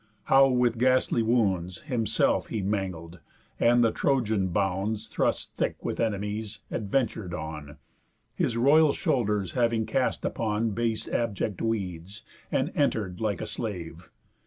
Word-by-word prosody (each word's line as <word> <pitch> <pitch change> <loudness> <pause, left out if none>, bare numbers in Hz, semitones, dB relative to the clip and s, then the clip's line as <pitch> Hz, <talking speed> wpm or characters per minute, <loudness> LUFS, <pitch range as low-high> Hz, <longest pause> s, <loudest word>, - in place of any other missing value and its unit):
How 135 +3 +6
with 125 -3 +1
ghastly 130 -1 +3
wounds 100 - 0
Himself 115 -7 +1
he 110 -4 -3
mangled, 90 -4 -3 0.4
and 120 +1 +4
the 115 - +3
Trojan 110 -8 +1
bounds, 100 +4 -1
Thrust - - -1
thick - - -2
with - - -2
enemies, 105 0 -2
adventur'd 105 -4 -1
on, 75 -2 -7 0.6
His 115 - -1
royal 145 +5 +5
shoulders 105 - 0
having 115 -2 +1
cast 130 +4 -1
upon 110 0 -1
Base 115 +1 -1
abject 105 -4 -2
weeds, 95 -4 -3 0.3
and - - 0
enter'd 95 -3 0
like 105 -5 -1
a - - -3
slave. 90 -6 -6
110 Hz, 130 wpm, -27 LUFS, 95-120 Hz, 0.6 s, How